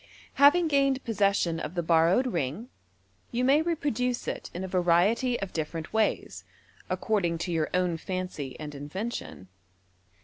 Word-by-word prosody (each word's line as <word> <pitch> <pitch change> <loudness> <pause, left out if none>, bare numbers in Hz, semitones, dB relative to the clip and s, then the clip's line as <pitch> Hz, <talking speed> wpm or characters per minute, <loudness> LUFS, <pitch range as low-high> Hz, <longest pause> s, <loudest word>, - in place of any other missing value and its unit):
Having 330 +4 +6
gained 275 -2 +2
possession 200 -6 +1
of 150 +5 -5
the 175 - -1
borrowed 165 +9 +4
ring, 180 - -3 0.6
you 245 +1 -1
may 280 +4 +5
repro 320 -4 -1
duce 250 +1 -2
it - - -4
in 180 - -5
a - - -3
variety 185 +8 +2
of 195 -1 -5
different 160 +2 -4
ways, 220 -1 0 0.5
according 185 -7 0
to 175 +2 -4
your 160 -2 0
own 180 -2 +1
fancy 180 -6 -5
and 150 -1 -6
invention. 145 - -6
185 Hz, 145 wpm, -28 LUFS, 165-245 Hz, 0.6 s, Having